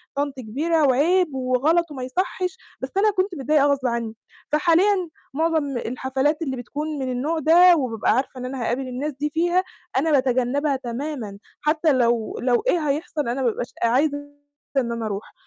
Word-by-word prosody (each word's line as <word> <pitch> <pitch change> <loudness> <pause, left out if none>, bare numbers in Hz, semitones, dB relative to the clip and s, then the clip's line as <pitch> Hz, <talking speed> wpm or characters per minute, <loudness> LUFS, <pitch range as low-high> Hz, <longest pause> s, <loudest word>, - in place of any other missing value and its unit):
طنط 285 -1 -1
كبيرة، 300 +8 0
وعيب، 310 +4 +2
وغلط 280 +6 +1
وما 260 -3 -6
يصحش." 365 - -2 0.2
بس 260 - -3
أنا 420 +1 +4
كنت 375 -1 -1
متضايقة 290 0 +2
غصب 275 -3 +1
عنّي. 230 -2 -2 0.4
فحاليًا 350 +4 +3 0.2
معظم 310 -4 0
الحفلات 265 +6 -1
اللي 265 -5 -2
بتكون 295 +4 -4
من 260 -1 -2
النوع 300 +6 -1
ده، 345 +4 +7
وبابقى 235 -6 0
عارفة 260 0 -2
إن 250 - -5
أنا 255 0 -5
هاقابل 255 +3 -1
الناس 275 +4 -3
دي 290 +3 -2
فيها، 350 +3 +2 0.3
أنا 310 +4 +2
باتجنبها 265 +2 +2
تمامًا، 250 -4 -5 0.2
حتى 305 0 +2
لو 235 -3 +1
لو 245 - +1
إيه 320 - +1
هيحصل 295 -2 -2
أنا 255 +3 -2
ما 240 - +3
ببقاش 235 +2 -5
عايزة 280 +5 +2 0.6
إن 240 -3 +1
أنا 230 -1 -4
أروح. 205 0 -6
280 Hz, 165 wpm, -23 LUFS, 255-320 Hz, 0.6 s, ده